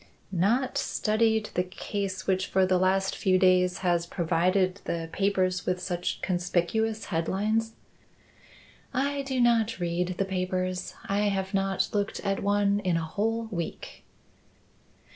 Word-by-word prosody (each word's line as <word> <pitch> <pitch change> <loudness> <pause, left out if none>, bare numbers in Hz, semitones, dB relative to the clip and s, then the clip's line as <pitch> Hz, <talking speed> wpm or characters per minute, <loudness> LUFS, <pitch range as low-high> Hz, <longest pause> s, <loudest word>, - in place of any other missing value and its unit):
"Not 235 +9 +1
studied 220 0 +1
the 180 - +2
case 190 +1 -4
which 190 0 +1
for 190 0 +3
the 185 -1 +2
last 190 +1 +2
few 185 -1 +2
days 180 -1 +4
has 170 -1 +2
provided 185 +3 +1
the 165 -1 -3
papers 185 -2 0
with 180 0 +1
such 180 -1 -3
conspicuous 185 +5 0
headlines?" 215 +7 0 1.2
"I 280 +2 0
do 270 -2 -2
not 230 -3 +3
read 175 +1 -1
the 195 - +1
papers. 185 -1 -2
I 200 +1 +1
have 190 -1 -2
not 195 -1 +1
looked 205 -1 -1
at 195 0 -1
one 205 0 +2
in 180 -4 +1
a 165 - -2
whole 225 +7 -1
week." 170 -4 -5
190 Hz, 135 wpm, -27 LUFS, 180-210 Hz, 1.2 s, days